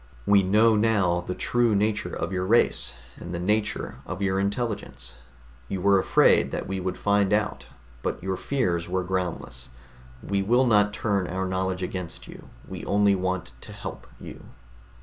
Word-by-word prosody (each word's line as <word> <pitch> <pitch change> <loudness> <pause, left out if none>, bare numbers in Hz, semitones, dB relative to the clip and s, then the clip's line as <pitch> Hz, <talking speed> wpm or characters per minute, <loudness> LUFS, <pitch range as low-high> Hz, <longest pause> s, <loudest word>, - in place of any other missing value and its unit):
We 100 -1 +5
know 110 +4 +4
now 100 -5 +2
the 90 - -3
true 120 -3 +1
nature 105 +1 0
of 85 - -3
your 90 0 -1
race, 115 +3 +2 0.2
and 85 +1 -7
the - - -3
nature 95 -9 -1
of 95 - -5
your 95 -1 0
intelligence. 100 - -3 0.5
You 95 - -3
were 100 +1 +4
afraid - - +4
that - - -4
we 95 0 -3
would 95 0 -3
find 100 -1 +2
out, 105 0 0 0.3
but - - -3
your 95 0 -1
fears 90 -9 -1
were 95 0 0
groundless. 85 -9 -4 0.5
We 100 0 0
will 120 +6 +3
not 105 -3 +4
turn 100 -3 -1
our 95 +2 -2
knowledge 95 0 -2
against 90 -2 -5
you. - - -12 0.2
We - - -7
only 100 0 +3
want 95 -1 -2
to - - -10
help - - -8
you." - - -10
95 Hz, 170 wpm, -26 LUFS, 90-105 Hz, 0.5 s, We